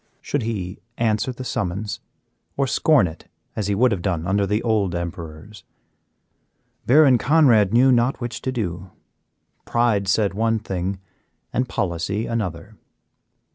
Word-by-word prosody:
Should 145 - -2
he 100 -5 -4 0.2
answer 110 +1 0
the 125 +1 -8
summons, 105 -4 -3 0.6
or 140 - +2
scorn 140 -2 +3
it 80 -2 -8 0.3
as 105 - -2
he 100 - 0
would 125 +4 +3
have 100 -4 -1
done 85 -4 -2
under 100 +2 +1
the 105 +3 0
old 105 -6 +1
emperors? 85 +3 -7 1.2
Baron 135 -2 +6
Conrad 120 -9 +4
knew 125 +3 +5
not 120 +2 +2
which 120 -1 -5
to 130 - -2
do; 95 -6 -4 0.7
pride 115 -5 +1
said 100 +1 +2
one 115 +2 +1
thing 95 -2 -4 0.5
and 125 +1 0
policy 95 +5 -2
another. 105 -2 -4
105 Hz, 135 wpm, -22 LUFS, 95-120 Hz, 1.2 s, Baron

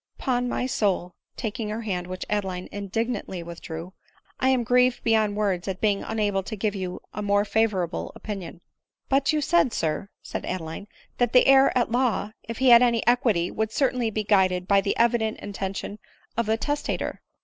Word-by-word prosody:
'Pon 250 -2 0
my 250 - -1
soul," 195 -7 0 0.2
taking 220 -1 -3
her 215 +2 -3
hand, 180 -5 -3
which 185 0 -5
Adeline 190 -3 -2
indignantly 205 -2 -3
withdrew, 170 +1 -8 0.2
" - - -34
I 260 - +3
am 255 -3 +2
Sprieved 250 +1 +3
beyond 220 -2 +2
words 195 -4 -1
at 190 -1 -3
being 205 -2 +1
unable 205 -3 0
to 215 +4 -6
give 210 0 -1
you 185 -3 -5
a 210 - -4
more 205 0 +2
avorable 205 -5 0
opinion." 190 -5 -7 0.2
" - - -54
But 275 +1 +3
you 305 -1 +1
said, 295 -5 +3
sir," 160 +5 -2
said - - -5
Adeline, 180 +2 -5 0.2
" - - -35
that 245 -2 +2
the 250 - +6
heir 270 0 +6
at 240 - +1
law, 240 -4 +1
if 230 0 -7
he 260 -1 +4
had 235 0 +9
any 235 -2 +2
equity, 225 -8 +2
would 220 0 -2
certainly 250 -3 +1
be 215 0 -2
guided 185 -3 +2
by 200 -1 +4
the 195 - -1
evident 230 -2 +2
intention 200 +1 -5 0.4
of 235 0 0
the 220 +1 +2
testator." 290 +5 -2
215 Hz, 190 wpm, -25 LUFS, 190-240 Hz, 0.4 s, had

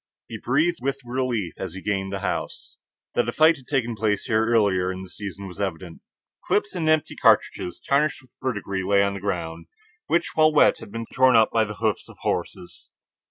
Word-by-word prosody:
He - - -7
breathed 155 +8 +1
with 135 +1 -1
relief 120 -7 -2
as 95 -2 -6
he 95 - -7
gained 95 -1 -1
the 100 -1 -4
house. 90 - -4 0.4
That - - +1
a - - 0
fight 160 +1 +5
had 130 -3 -17
taken 120 -5 0
place 105 -2 0
here 110 0 +1
earlier 100 -6 +2
in 95 0 -6
the 95 - -11
season 100 -1 -7
was 90 +2 -8
evident. 90 -3 -4 0.4
Clips 205 0 0
and 165 -4 -1
empty 155 -1 +1
cartridges, 90 - +2
tarnished 140 0 0
with 125 - -24
verdigris, 100 -7 -2
lay 100 +1 +3
on 100 0 0
the 100 - -5
ground, 85 -4 -4 0.4
which, 170 0 +1
while 155 0 +5
wet, 150 - +4
had 100 - -11
been 115 +1 -5
torn 130 -1 +5
up 110 -1 +5
by 110 -1 +2
the 105 0 -7
hoofs 110 -2 -1
of - - -14
horses. 90 -2 -4
110 Hz, 205 wpm, -24 LUFS, 95-130 Hz, 0.4 s, fight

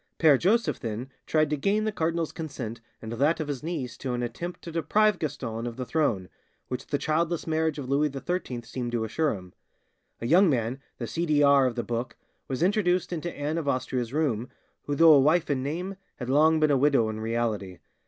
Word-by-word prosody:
Pere 155 -4 +6
Joseph 225 +6 +2
then 115 +4 -5 0.2
tried 155 -1 +2
to - - +2
gain 200 +9 +1
the 215 - 0
cardinal's 165 -3 -1
consent 125 -8 -6 0.2
and 110 - -6
that 145 +8 +2
of 155 - -2
his 140 -3 -3
niece 150 -7 -4
to 130 -2 -3
an 120 0 -2
attempt 170 +10 -5
to 170 - -7
deprive 190 +6 +2
Gaston 120 -6 -3
of 120 - -5
the 130 0 -4
throne, 120 - 0 0.4
which 125 0 -4
the 145 - 0
childless 165 +3 0
marriage 160 -1 0
of 140 -3 -5
Louis 145 +3 +2
XIII 135 -3 -3
seemed 120 0 -4
to 115 -2 0
assure 140 +5 0
him. 90 -2 -11 0.7
A - - -5
young 175 +8 +5
man, 125 -1 0 0.2
the 120 - -4
C. 170 +8 -2
D. 150 -1 +3
R. 140 -2 +6
of 120 - -3
the 120 - -2
book, 120 +1 -3 0.3
was 135 +4 -2
introduced 180 -2 +2
into 175 +1 -3
Anne 150 +3 -1
of 155 - -5
Austria's 130 -3 -1
room, 130 -6 0 0.4
who 145 - 0
though 165 +1 +8
a 145 - +7
wife 155 +3 +3
in 135 -2 0
name 175 +8 -4 0.2
had 125 -1 -6
long 155 +3 +5
been 155 -1 +3
a 140 - +4
widow 135 -4 +3
in 110 0 -4
reality. 110 -5 -2
145 Hz, 210 wpm, -27 LUFS, 120-160 Hz, 0.7 s, though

